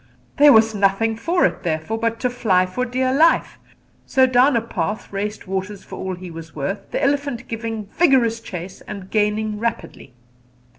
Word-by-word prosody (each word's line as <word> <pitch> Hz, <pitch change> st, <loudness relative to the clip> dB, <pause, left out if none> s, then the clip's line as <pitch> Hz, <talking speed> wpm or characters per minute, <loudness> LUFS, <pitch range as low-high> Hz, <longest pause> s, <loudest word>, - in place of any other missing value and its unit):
There 290 Hz, 0 st, +8 dB
was 220 Hz, -1 st, +5 dB
nothing 205 Hz, +2 st, +1 dB
for 335 Hz, +11 st, +1 dB
it, 180 Hz, -1 st, -1 dB
therefore, 165 Hz, +7 st, -2 dB
but 230 Hz, 0 st, -1 dB
to 250 Hz, -, +1 dB
fly 190 Hz, -7 st, +2 dB
for 250 Hz, +8 st, -3 dB
dear 255 Hz, +1 st, 0 dB
life; 320 Hz, +4 st, +3 dB, 0.5 s
so 260 Hz, -1 st, +4 dB
down 255 Hz, +2 st, +4 dB
a -, -, +1 dB
path 215 Hz, -2 st, -4 dB
raced 210 Hz, +2 st, -4 dB
Waters 190 Hz, +1 st, -4 dB
for -, -, -10 dB
all 190 Hz, -1 st, -3 dB
he 180 Hz, -1 st, -9 dB
was 165 Hz, -1 st, -10 dB
worth, 155 Hz, +8 st, -4 dB
the -, -, -2 dB
elephant 280 Hz, -3 st, -1 dB
giving 225 Hz, -2 st, -4 dB
vigorous 240 Hz, -, +2 dB
chase 185 Hz, -4 st, -8 dB
and 195 Hz, -2 st, -8 dB
gaining 210 Hz, 0 st, 0 dB
rapidly. 220 Hz, -, -5 dB
220 Hz, 175 wpm, -21 LUFS, 190-245 Hz, 0.5 s, There